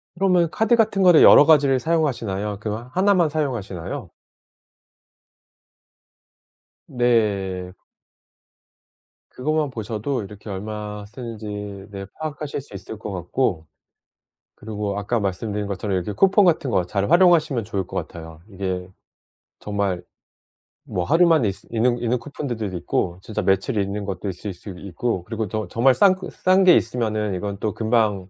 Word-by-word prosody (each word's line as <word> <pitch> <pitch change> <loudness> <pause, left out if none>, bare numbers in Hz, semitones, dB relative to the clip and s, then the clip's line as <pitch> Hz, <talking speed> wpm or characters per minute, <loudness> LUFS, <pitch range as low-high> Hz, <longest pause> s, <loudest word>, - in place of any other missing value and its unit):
그러면 180 -3 +3
카드 225 +2 +3
같은 215 -4 +2
거를 175 -3 +7
여러 145 - +9
가지를 140 -4 +5
사용하시나요? 115 -11 -1
그거 110 +3 -5
하나만 185 -3 +3
사용하시나요? 120 - -4 2.8
네. 100 -7 0 1.6
그것만 155 +2 -1
보셔도 115 +2 -3
이렇게 105 +2 -11
얼마 105 +1 -5
쓰는지 115 -1 -8 0.5
네 100 -1 -6
파악하실 150 -2 -4
수 130 - -17
있을 100 +2 -8
것 105 - -6
같고 90 -1 -1 0.9
그리고 105 -2 -4
아까 110 +3 -1
말씀드린 105 +1 -2
것처럼 100 0 -2
이렇게 95 +3 -3
쿠폰 195 - +4
같은 160 -6 +2
거 95 -5 +2
잘 100 +2 -1
활용하시면 165 - +4
좋을 100 -3 -3
것 - - -5
같아요. 80 -1 -11
이게 95 -2 -4 0.7
정말 100 -3 -2 0.8
뭐 90 - -3
하루 170 - +4
만에 155 -11 +4
있스 95 - -8
있는 120 +2 +2
있는 120 +1 0
쿠폰들도 120 -3 -5
있고 85 +1 -2
진짜 105 +1 -4
며칠 95 +5 +1
있는 100 +1 -2
것도 95 0 -4
있을 95 +2 -6
수 90 +4 -12
있고 95 +2 -3
그리고 110 -2 -3
저 110 0 -3
정말 120 +8 +3
싼 190 +5 +5 0.2
싼 185 +1 +3
게 180 -2 +7
있으면은 110 -4 0
이건 100 +2 -4
또 105 -1 -2
금방 110 -4 0
110 Hz, 300 characters per minute, -22 LUFS, 100-140 Hz, 2.8 s, 여러